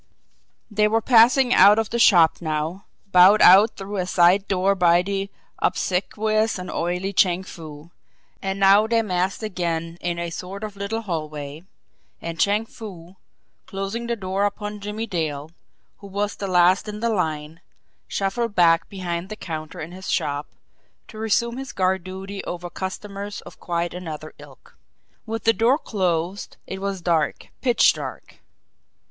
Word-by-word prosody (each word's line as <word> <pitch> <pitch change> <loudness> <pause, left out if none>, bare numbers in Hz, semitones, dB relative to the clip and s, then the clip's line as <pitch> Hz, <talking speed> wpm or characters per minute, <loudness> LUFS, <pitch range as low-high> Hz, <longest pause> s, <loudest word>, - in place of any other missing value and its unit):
They 210 0 +3
were 225 +1 +2
passing 245 +2 +5
out 205 +3 +7
of 225 -2 -1
the 235 - -1
shop 175 -8 +5
now, 155 +3 -3 0.3
bowed 185 +4 +7
out 200 +5 +7
through 200 +1 -6
a 180 -1 -1
side 185 +3 +4
door 195 +1 +2
by 175 -2 +4
the 195 +1 -3 0.3
obsequious 215 +4 0
and 180 0 -6
oily 180 +3 -2
Chang 185 -1 +3
Foo. 160 -2 -11 0.5
And 195 0 -3
now 200 +2 +5
they 230 0 +2
massed 185 +1 -1
again 170 -4 -3
in 175 -1 -2
a 170 0 -4
sort 190 +4 -7
of 210 -2 -6
little 200 +3 -3
hallway 155 -5 -5 0.6
and 165 0 -6
Chang 205 +2 +2
Foo, 190 -5 -11 0.5
closing 200 +4 -4
the 235 - -1
door 195 -1 -1
upon 210 0 -4
Jimmie 210 +2 -4
Dale, 160 -6 -3 0.5
who 200 - -11
was 205 +1 -2
the 200 - -5
last 180 +3 +3
in 210 0 -6
the 235 +1 0
line, 160 -6 -2 0.5
shuffled 205 +3 -2
back 165 -2 +4
behind 180 -2 -4
the 215 - -5
counter 155 -6 -7
in 160 +2 -6
his 190 +1 -8
shop 145 0 -1 0.6
to 215 - -10
resume 235 +2 0
his 270 0 -7
guard 185 -1 0
duty 190 +2 -7
over 175 0 -6
customers 200 +1 -6
of - - -14
quite 170 0 -2
another 160 -4 -7
ilk. - - -16 0.5
With 225 -1 -4
the 225 - +4
door 235 +5 +3
closed, 185 - -2
it 190 0 -7
was 195 -2 -3
dark, 165 -3 0
pitch 245 -3 +4
dark. - - -8
190 Hz, 155 wpm, -23 LUFS, 175-210 Hz, 0.6 s, out